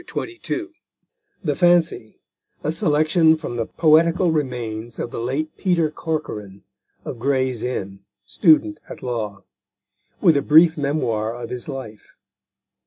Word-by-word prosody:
THE -, -, -13 dB
FANCY 355 Hz, -1 st, -4 dB, 0.7 s
THE 150 Hz, -5 st, 0 dB
FANCY: 175 Hz, -10 st, +2 dB, 0.4 s
_A 150 Hz, -, 0 dB
Selection 160 Hz, -1 st, +3 dB
from 150 Hz, -6 st, -6 dB
the 115 Hz, -, -2 dB
Poetical 165 Hz, +2 st, +3 dB
Remains 120 Hz, -6 st, -3 dB
of 120 Hz, -, -4 dB
the -, -, -5 dB
late 135 Hz, +7 st, -3 dB
Peter 170 Hz, -5 st, +1 dB
Corcoran, 105 Hz, -, -5 dB, 0.4 s
of 120 Hz, -, -6 dB
Gray's 130 Hz, -2 st, 0 dB
Inn, 100 Hz, -6 st, -4 dB, 0.3 s
student 315 Hz, 0 st, +3 dB
at -, -, -10 dB
law. 110 Hz, -5 st, -4 dB, 0.8 s
With 165 Hz, -, +5 dB
a -, -, +2 dB
brief 160 Hz, +3 st, +6 dB
Memoir 120 Hz, -7 st, -1 dB
of 120 Hz, -, -7 dB
his 125 Hz, +3 st, -6 dB
life. 130 Hz, -6 st, -9 dB
145 Hz, 130 wpm, -22 LUFS, 115-165 Hz, 0.8 s, brief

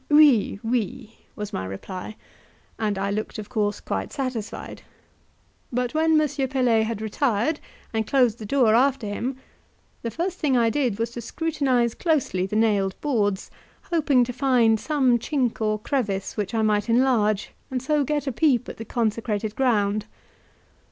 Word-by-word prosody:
"Oui, 295 Hz, -9 st, +5 dB
oui," 230 Hz, 0 st, -2 dB, 0.2 s
was 210 Hz, -1 st, -6 dB
my 95 Hz, -, -2 dB
reply, 180 Hz, -, -7 dB, 0.6 s
and 210 Hz, -3 st, 0 dB
I 200 Hz, +1 st, -1 dB
looked 215 Hz, +3 st, -3 dB
of 215 Hz, -1 st, -7 dB
course 210 Hz, -4 st, -1 dB
quite -, -, -4 dB
satisfied; 255 Hz, -6 st, -5 dB, 0.9 s
but 250 Hz, 0 st, -1 dB
when 315 Hz, 0 st, +4 dB
M. 305 Hz, -, +3 dB, 0.2 s
Pelet 245 Hz, -4 st, +2 dB
had 220 Hz, -1 st, -4 dB
retired 240 Hz, +5 st, 0 dB, 0.3 s
and 220 Hz, -1 st, -1 dB
closed 245 Hz, -5 st, +3 dB
the 215 Hz, -, -6 dB
door 245 Hz, -3 st, +3 dB
after 260 Hz, 0 st, +3 dB
him, 235 Hz, +6 st, -3 dB, 0.7 s
the 230 Hz, -, -3 dB
first 345 Hz, +8 st, -3 dB
thing 275 Hz, -5 st, +2 dB
I 230 Hz, -1 st, +3 dB
did 255 Hz, -7 st, 0 dB
was 230 Hz, +1 st, -2 dB
to 240 Hz, -, -6 dB
scrutinize 260 Hz, -4 st, 0 dB
closely 275 Hz, -, 0 dB
the 210 Hz, -, -4 dB
nailed 205 Hz, -4 st, +2 dB
boards, 205 Hz, -9 st, 0 dB, 0.4 s
hoping 290 Hz, -6 st, +3 dB
to 250 Hz, +1 st, -3 dB
find 245 Hz, -4 st, +3 dB
some 265 Hz, -5 st, +2 dB
chink 250 Hz, -3 st, -1 dB
or 215 Hz, -1 st, +1 dB
crevice 210 Hz, -5 st, -2 dB
which 210 Hz, +1 st, -3 dB
I 220 Hz, -, +2 dB
might 210 Hz, 0 st, +1 dB
enlarge, 230 Hz, -4 st, +2 dB, 0.2 s
and 260 Hz, -, -1 dB
so 290 Hz, +3 st, +1 dB
get 295 Hz, 0 st, -1 dB
a 270 Hz, -, -1 dB
peep 255 Hz, -2 st, +2 dB
at -, -, -7 dB
the 225 Hz, -, -7 dB
consecrated 220 Hz, -2 st, -1 dB
ground. 215 Hz, -5 st, +1 dB
235 Hz, 160 wpm, -24 LUFS, 215-270 Hz, 0.9 s, Oui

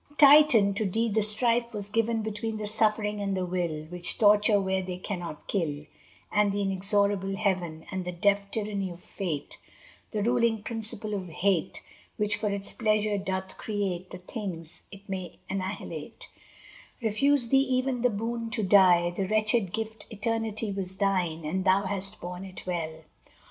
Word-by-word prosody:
II 290 Hz, -, -22 dB
Titan! 280 Hz, -9 st, +7 dB
to 205 Hz, -, 0 dB
thee 225 Hz, +4 st, +1 dB
the 220 Hz, +1 st, +2 dB
strife 235 Hz, +3 st, +1 dB
was 205 Hz, -1 st, -4 dB
given 225 Hz, 0 st, +1 dB
Between 220 Hz, +1 st, -3 dB
the 215 Hz, -, -4 dB
suffering 210 Hz, -1 st, +1 dB
and 195 Hz, -1 st, -1 dB
the 185 Hz, -, -1 dB
will, 175 Hz, -4 st, -2 dB
Which 175 Hz, +1 st, -4 dB
torture 210 Hz, 0 st, +5 dB
where 190 Hz, -1 st, 0 dB
they 180 Hz, -1 st, -5 dB
cannot 175 Hz, -5 st, -6 dB
kill; 150 Hz, -6 st, -2 dB, 0.5 s
And 210 Hz, -1 st, +3 dB
the 200 Hz, 0 st, -1 dB
inexorable 195 Hz, 0 st, +1 dB
Heaven, 180 Hz, -6 st, -1 dB
And 190 Hz, -1 st, -2 dB
the 180 Hz, -, -4 dB
deaf 200 Hz, +3 st, +1 dB
tyranny 205 Hz, -3 st, -2 dB
of 175 Hz, -1 st, -9 dB
Fate, 175 Hz, -5 st, -5 dB, 0.5 s
The 210 Hz, -2 st, -2 dB
ruling 235 Hz, -2 st, +2 dB
principle 215 Hz, -1 st, -3 dB
of 190 Hz, -3 st, -3 dB
Hate, 185 Hz, +2 st, 0 dB, 0.3 s
Which 210 Hz, 0 st, +1 dB
for 210 Hz, -, -1 dB
its 200 Hz, 0 st, -2 dB
pleasure 215 Hz, -2 st, +1 dB
doth 190 Hz, -1 st, -4 dB
create 190 Hz, -4 st, -2 dB
The 180 Hz, -, -7 dB
things 180 Hz, -4 st, -7 dB
it 200 Hz, 0 st, -13 dB
may 185 Hz, -3 st, -5 dB
annihilate, 190 Hz, +1 st, -5 dB, 0.7 s
Refused 245 Hz, +2 st, +2 dB
thee 270 Hz, -, +6 dB
even 255 Hz, -2 st, +1 dB
the 250 Hz, -, +4 dB
boon 230 Hz, +2 st, -3 dB
to 225 Hz, -3 st, 0 dB
die; 185 Hz, -3 st, +6 dB
The 190 Hz, 0 st, -1 dB
wretched 215 Hz, -1 st, +2 dB
gift 220 Hz, +1 st, -5 dB
eternity 220 Hz, 0 st, -2 dB
Was 190 Hz, -1 st, -4 dB
thine 180 Hz, -5 st, 0 dB
and 185 Hz, +5 st, -1 dB
thou 190 Hz, +1 st, +4 dB
hast 195 Hz, 0 st, -3 dB
borne 180 Hz, +2 st, -6 dB
it 185 Hz, -1 st, -9 dB
well. 160 Hz, -3 st, -3 dB
200 Hz, 165 wpm, -28 LUFS, 185-220 Hz, 0.7 s, Titan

